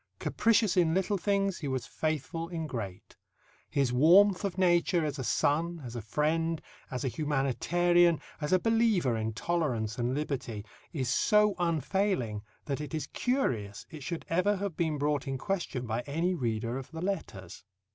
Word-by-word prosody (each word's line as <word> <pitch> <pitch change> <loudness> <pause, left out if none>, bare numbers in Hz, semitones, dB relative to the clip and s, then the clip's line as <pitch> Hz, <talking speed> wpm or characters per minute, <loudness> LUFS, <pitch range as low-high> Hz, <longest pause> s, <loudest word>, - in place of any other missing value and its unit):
Capricious 220 -3 +2
in 170 -2 +3
little 190 +1 +1
things, 195 -1 0
he 150 - -4
was 130 -1 -2
faithful 160 +2 -3
in 165 -2 -3
great. 105 -10 -6 0.5
His 135 -3 +1
warmth 180 +9 +6
of 195 -2 -2
nature 175 -2 +3
as 145 -1 -3
a - - -2
son, 165 +7 +1
as 120 0 -7
a 120 - -3
friend, 160 +8 0 0.3
as 125 +2 -4
a - - +1
humanitarian, 160 +5 +2 0.2
as 150 - -2
a 185 - +6
believer 220 - +2
in 110 0 -1
tolerance 125 -7 -1
and 120 +2 0
liberty, 125 -8 -3 0.3
is 135 -6 -2
so 210 - +4
unfailing 165 - 0 0.2
that 140 -1 -2
it 150 +2 -5
is 155 - -2
curious 120 - -1
it 155 -3 -9
should 170 +4 -5
ever 185 +5 +2
have 195 -3 -3
been 160 -3 0
brought 145 -1 0
in 135 0 -2
question 170 -7 -3
by 115 +1 -2
any 165 +6 0
reader 115 -4 -2
of 130 - -10
the 160 0 -7
letters. 95 - -4
155 Hz, 165 wpm, -30 LUFS, 130-180 Hz, 0.5 s, warmth